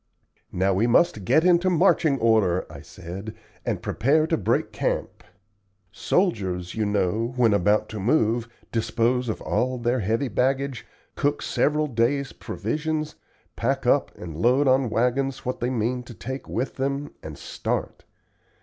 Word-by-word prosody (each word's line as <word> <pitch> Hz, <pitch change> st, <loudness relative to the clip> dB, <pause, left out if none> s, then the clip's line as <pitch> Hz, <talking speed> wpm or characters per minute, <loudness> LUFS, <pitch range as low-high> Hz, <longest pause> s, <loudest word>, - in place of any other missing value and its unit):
"Now 95 Hz, +2 st, +1 dB
we 105 Hz, +6 st, +2 dB
must 120 Hz, -, +3 dB
get 155 Hz, -, +4 dB
into 180 Hz, 0 st, +4 dB
marching 165 Hz, -4 st, +3 dB
order," 110 Hz, -7 st, +2 dB
I 75 Hz, -2 st, -10 dB
said, 90 Hz, +8 st, -8 dB, 0.3 s
"and -, -, -3 dB
prepare 150 Hz, +6 st, +2 dB
to 160 Hz, -, +1 dB
break -, -, 0 dB
camp. -, -, -2 dB, 0.7 s
Soldiers, 95 Hz, -, -1 dB
you 110 Hz, -2 st, -1 dB
know, 105 Hz, +4 st, 0 dB
when 115 Hz, -4 st, +4 dB
about 105 Hz, +2 st, +2 dB
to 110 Hz, -, -6 dB
move, 115 Hz, +1 st, +1 dB, 0.2 s
dispose 120 Hz, +2 st, 0 dB
of 110 Hz, -, -3 dB
all 130 Hz, +1 st, 0 dB
their 120 Hz, +1 st, 0 dB
heavy 115 Hz, +6 st, 0 dB
baggage, 130 Hz, +2 st, -1 dB, 0.3 s
cook 145 Hz, +1 st, 0 dB
several 150 Hz, +1 st, +1 dB
days' 135 Hz, +1 st, 0 dB
provisions, 155 Hz, +7 st, -3 dB, 0.4 s
pack -, -, -1 dB
up -, -, +3 dB
and 85 Hz, -3 st, -8 dB
load 125 Hz, -, +3 dB
on 130 Hz, -1 st, +3 dB
wagons 130 Hz, +4 st, 0 dB
what 125 Hz, +1 st, -2 dB
they 120 Hz, -, -1 dB
mean 125 Hz, 0 st, -1 dB
to 120 Hz, -, -11 dB
take 130 Hz, +3 st, -6 dB
with 130 Hz, -, -3 dB
them, 140 Hz, +2 st, -2 dB
and -, -, -8 dB
start. -, -, -4 dB
120 Hz, 150 wpm, -24 LUFS, 110-140 Hz, 0.7 s, get